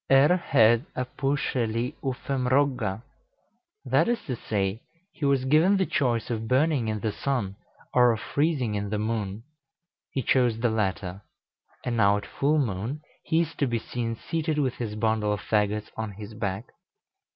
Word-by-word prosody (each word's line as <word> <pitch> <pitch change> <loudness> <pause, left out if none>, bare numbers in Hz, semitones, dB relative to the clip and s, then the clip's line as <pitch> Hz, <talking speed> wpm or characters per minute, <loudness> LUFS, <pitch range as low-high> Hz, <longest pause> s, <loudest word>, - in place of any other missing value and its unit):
Er 135 +6 +6
hed 120 -7 +4
a 130 - -1
püscheli 125 -2 -1
uffem 130 -1 -2
rogga." 125 -7 +1 0.8
That - - +3
is 240 -1 +1
to 130 -6 -3
say, 100 -1 -2 0.3
he 150 - -3
was 135 -2 +2
given 160 +9 +4
the 190 - +2
choice 120 -6 0
of 110 -1 -2
burning 135 -1 +2
in 110 -1 -2
the 110 - 0
sun, 105 -5 -2 0.4
or 125 -1 +6
of 110 - -2
freezing 140 -7 0
in 100 0 -2
the 105 - -1
moon; 105 -1 -2 0.7
he 135 - -2
chose 120 -3 +3
the 120 -1 +1
latter; 100 -3 -2 0.6
and 120 -1 -1
now 100 -2 +4
at 100 - -6
full 150 +3 +1
moon 120 +2 -2 0.2
he 160 +1 +3
is 165 -1 -3
to 140 - +2
be 120 -1 0
seen 115 0 -3
seated 160 +5 -2
with 135 -4 +1
his 110 -3 -4
bundle 110 -1 +1
of 105 - -3
fagots 105 0 0
on 110 -2 -4
his 105 +2 -9
back. 100 +1 -4
120 Hz, 170 wpm, -26 LUFS, 105-140 Hz, 0.8 s, Er